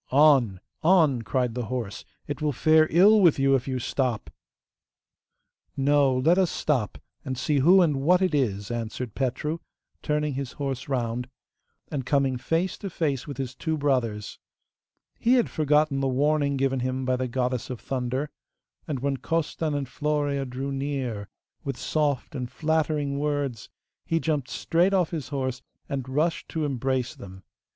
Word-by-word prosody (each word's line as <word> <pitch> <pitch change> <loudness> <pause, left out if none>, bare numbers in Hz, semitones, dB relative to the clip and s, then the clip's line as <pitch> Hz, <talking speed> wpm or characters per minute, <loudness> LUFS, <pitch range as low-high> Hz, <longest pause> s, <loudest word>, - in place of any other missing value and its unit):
'On! 135 -9 +5 0.2
on!' 160 -8 +4
cried 125 +1 -1
the 125 -1 -3
horse; 120 -4 -4 0.2
'it 145 +1 -5
will 150 -1 +1
fare 155 +2 +4
ill 205 +6 +6
with 170 -5 +5
you 135 0 +3
if 135 -1 +1
you 130 -1 -1
stop.' 120 - -2 1.5
'No, 140 -1 +3
let 165 +8 +4
us 185 -3 +3
stop, 130 -11 -1 0.3
and 130 -1 -4
see 145 +2 +1
who 180 +7 +6
and 150 -5 +1
what 170 +7 +4
it 185 -3 +1
is!' 105 -7 0
answered 115 0 -4
Petru, 150 +5 -2 0.4
turning 150 -1 0
his 135 -1 -4
horse 135 -2 -4
round, 125 -1 -2 0.6
and 140 -3 -2
coming 135 0 +1
face 165 +8 -1
to 200 - -5
face 150 -7 -2
with 140 -3 -6
his 130 -2 -4
two 160 +4 -2
brothers. 125 -8 -1 0.8
He 240 - +3
had 245 - +2
forgotten 150 -2 +2
the 135 - +1
warning 140 +1 +1
given 135 -1 +1
him 130 +1 -2
by 130 0 +2
the 130 0 -2
Goddess 125 0 -2
of 125 -3 -5
Thunder, 130 +2 -3 0.6
and 135 -5 -3
when 140 0 0
Costan 160 0 -1
and 140 -1 -1
Florea 145 -1 -1
drew 135 +3 -4
near 135 -7 -3 0.3
with 135 -3 -4
soft 150 -4 -1
and 125 -3 -4
flattering 150 -2 0
words 145 -6 -2 0.4
he 165 - +1
jumped 150 -5 -1
straight 180 +4 +1
off 180 -4 +1
his 155 -6 -4
horse, 130 -3 -2 0.3
and 135 -2 -4
rushed 155 +5 0
to 160 -2 -2
embrace 130 -2 -1
them. 95 0 -11
140 Hz, 160 wpm, -26 LUFS, 125-150 Hz, 1.5 s, ill